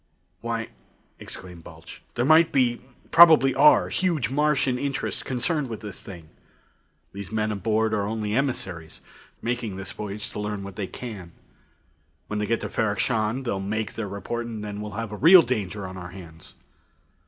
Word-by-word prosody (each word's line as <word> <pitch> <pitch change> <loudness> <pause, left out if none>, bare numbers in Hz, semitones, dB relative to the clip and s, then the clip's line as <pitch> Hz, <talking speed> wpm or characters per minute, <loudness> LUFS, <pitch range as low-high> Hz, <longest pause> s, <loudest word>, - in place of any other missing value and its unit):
"Why," 115 -1 -3 0.5
exclaimed 90 -3 -9
Balch, - - -12
"there 120 - +1
might 160 +2 +6
be 125 -3 +2 0.3
probably 160 -5 +8
are 145 +3 +5
huge 160 -11 0
Martian 140 -3 +1
interests 140 0 -2
concerned 135 +1 -2
in 110 - -4
this 105 -2 -8
thing. 85 -5 -10 0.8
These 100 0 -8
men 110 -1 0
aboard 110 +1 0
are 100 -1 0
only 105 -1 -2
emissaries, 95 - -3 0.4
making 115 -4 -2
this 95 0 -6
voyage 105 +1 -5
to - - -6
learn 105 -1 -3
what 100 -1 -8
they 100 -2 -3
can. 95 -9 -8 0.9
When 105 - -3
they 105 - -1
get 115 +1 0
to - - -3
Ferrok 105 -2 0
Shahn, 115 +2 0
they'll 100 -6 -2
make 105 +2 -3
their 110 -2 -4
report, 115 +4 -4
and 110 -2 -6
then 105 0 -5
we'll 105 -2 -6
have 115 0 -4
a - - -5
real 170 - +8
danger 105 -6 -3
on 95 0 -7
our 90 -1 -7
hands. 85 -3 -12
110 Hz, 170 wpm, -25 LUFS, 100-125 Hz, 0.9 s, probably